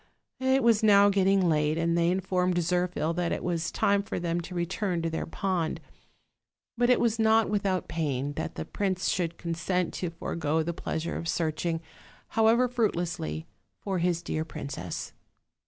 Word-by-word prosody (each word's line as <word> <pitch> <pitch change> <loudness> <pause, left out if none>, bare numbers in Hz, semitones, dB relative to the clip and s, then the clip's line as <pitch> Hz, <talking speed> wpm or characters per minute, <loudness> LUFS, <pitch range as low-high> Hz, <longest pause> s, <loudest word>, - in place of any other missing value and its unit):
It 265 +1 +2
was 230 -2 +4
now 205 -2 +6
getting 195 -1 +3
late, 155 -1 +2
and 170 0 +1
they 170 0 +3
informed 180 0 +1
Zirphil 175 -1 0
that 175 -1 0
it - - -2
was 170 -2 -1
time 200 0 +2
for 200 - -4
them 170 0 -1
to 180 +2 -8
return 175 0 -1
to 165 - -1
their 160 - -3
pond, 175 -2 -1 1.0
but 240 +1 +2
it 250 - +5
was 230 -1 +1
not 220 -1 +4
without 195 -4 0
pain 145 -4 -2
that 160 - -4
the - - -4
prince 190 -2 -1
could 170 -2 -2
consent 170 +2 -1
to 180 - -3
forego 160 -1 -1
the 170 +2 -2
pleasure 160 0 -3
of 165 - -5
searching, 165 0 -1 0.5
how 220 0 +3
ever 235 +3 +4
fruitlessly, 175 - -1 0.3
for 190 -3 -2
his 170 0 0
dear 155 -2 -2
princess. 140 - -6
175 Hz, 170 wpm, -28 LUFS, 165-200 Hz, 1.0 s, now